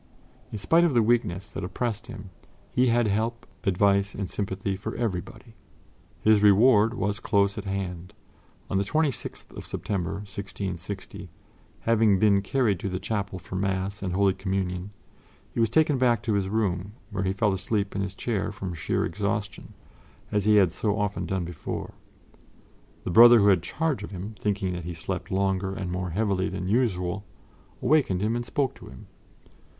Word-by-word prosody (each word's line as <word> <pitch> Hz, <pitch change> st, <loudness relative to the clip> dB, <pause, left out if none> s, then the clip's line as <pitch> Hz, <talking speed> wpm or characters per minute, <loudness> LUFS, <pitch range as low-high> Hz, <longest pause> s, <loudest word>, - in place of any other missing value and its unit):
In 110 Hz, -, -4 dB
spite 165 Hz, -, +3 dB
of 165 Hz, -7 st, +2 dB
the 115 Hz, -, +5 dB
weakness 105 Hz, -5 st, +1 dB
that 95 Hz, -, -5 dB
oppressed 115 Hz, +4 st, -3 dB
him, 105 Hz, -5 st, -9 dB, 0.4 s
he 125 Hz, +1 st, +3 dB
had 120 Hz, 0 st, +3 dB
help, 110 Hz, +3 st, -1 dB, 0.2 s
advice 100 Hz, 0 st, +2 dB
and 100 Hz, -2 st, -3 dB
sympathy 95 Hz, 0 st, -3 dB
for 95 Hz, -, -5 dB
everybody. 110 Hz, +1 st, -4 dB, 0.7 s
His 110 Hz, -1 st, +5 dB
reward 105 Hz, +2 st, +5 dB
was 105 Hz, -1 st, -1 dB
close 100 Hz, -3 st, +2 dB
at -, -, -6 dB
hand. 95 Hz, -1 st, -4 dB, 0.5 s
On 95 Hz, -, 0 dB
the -, -, +1 dB
26th 150 Hz, +5 st, -2 dB
of -, -, -7 dB
September, 95 Hz, -2 st, -2 dB
1660, 100 Hz, -1 st, -6 dB, 0.5 s
having 110 Hz, -3 st, +4 dB
been 100 Hz, 0 st, +4 dB
carried 110 Hz, -3 st, +1 dB
to 100 Hz, -, -3 dB
the 90 Hz, -, -2 dB
chapel 100 Hz, -1 st, -3 dB
for 95 Hz, -, -11 dB
Mass 95 Hz, +1 st, -1 dB
and 95 Hz, -2 st, -2 dB
Holy 100 Hz, 0 st, +3 dB
Communion, 95 Hz, -1 st, -2 dB, 0.6 s
he -, -, -3 dB
was 115 Hz, -1 st, +3 dB
taken 155 Hz, -4 st, +3 dB
back 120 Hz, -4 st, +3 dB
to 110 Hz, -, 0 dB
his 100 Hz, -2 st, 0 dB
room, 100 Hz, -2 st, -1 dB, 0.2 s
where 100 Hz, -1 st, -2 dB
he 95 Hz, -, +1 dB
fell 100 Hz, +1 st, +1 dB
asleep 100 Hz, +1 st, -1 dB
in 100 Hz, -, 0 dB
his 95 Hz, -1 st, -4 dB
chair 105 Hz, -3 st, -2 dB
from 95 Hz, -2 st, -5 dB
sheer 80 Hz, -, -1 dB
exhaustion, 100 Hz, +2 st, -3 dB, 0.6 s
as 105 Hz, -1 st, +1 dB
he 105 Hz, 0 st, +5 dB
had 95 Hz, -5 st, +5 dB
so 105 Hz, +5 st, -1 dB
often 105 Hz, -1 st, -2 dB
done 95 Hz, -2 st, -1 dB
before. 85 Hz, 0 st, -6 dB, 1.1 s
The -, -, -3 dB
brother 120 Hz, +5 st, +9 dB
who 100 Hz, -2 st, +5 dB
had 95 Hz, -4 st, +4 dB
charge 150 Hz, -, -1 dB
of 105 Hz, -, -6 dB
him, 100 Hz, +3 st, -6 dB
thinking 95 Hz, -3 st, -1 dB
that 90 Hz, -1 st, -5 dB
he 85 Hz, -1 st, -5 dB
slept 90 Hz, +2 st, -5 dB
longer 95 Hz, -1 st, 0 dB
and 90 Hz, -2 st, -4 dB
more 90 Hz, 0 st, -2 dB
heavily 95 Hz, 0 st, 0 dB
than 90 Hz, -, -4 dB
usual, 100 Hz, -4 st, 0 dB, 0.6 s
awakened 125 Hz, -9 st, +3 dB
him 110 Hz, +2 st, +1 dB
and 120 Hz, -, -1 dB
spoke 130 Hz, +2 st, -1 dB
to -, -, -13 dB
him. 65 Hz, -, -12 dB
100 Hz, 175 wpm, -26 LUFS, 95-110 Hz, 1.1 s, brother